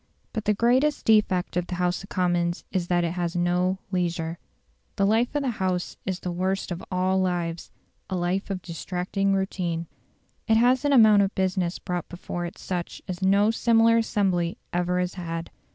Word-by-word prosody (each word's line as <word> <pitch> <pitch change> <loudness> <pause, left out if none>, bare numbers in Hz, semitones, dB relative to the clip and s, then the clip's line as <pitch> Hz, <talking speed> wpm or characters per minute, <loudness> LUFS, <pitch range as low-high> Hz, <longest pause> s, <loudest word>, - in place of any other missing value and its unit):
But 220 -2 -3
the 210 - +2
greatest 255 +7 +2
defect 210 -6 +3
of 180 0 -1
the 180 - -4
House 180 0 0
of 195 - -12
Commons 175 -1 0
is 185 -3 -1
that 175 -1 +2
it 170 - 0
has 175 -1 -2
no 180 +2 +1
leisure. 170 -2 -1 0.6
The 195 - +2
life 225 +6 +2
of 290 - +1
the 260 - 0
House 185 -4 -2
is 185 -1 -2
the 180 - -3
worst 185 +2 -1
of 175 +1 -4
all 185 +1 +1
lives 175 -2 -2 0.4
a 190 - -2
life 180 +3 -1
of 190 -2 -4
distracting 185 +3 -2
routine. 180 -3 -2 0.6
It 220 -1 +4
has 250 +3 +4
an 290 - +3
amount 220 -6 +7
of 195 0 0
business 185 -2 0
brought 180 -2 -4
before 175 0 -5
it 170 - -11
such 175 -2 -5
as 185 0 -5
no 200 +3 +4
similar 230 0 +4
assembly 190 -6 0 0.2
ever 180 +1 +1
has 180 0 -1
had. 165 -2 -5
185 Hz, 185 wpm, -25 LUFS, 175-200 Hz, 0.6 s, amount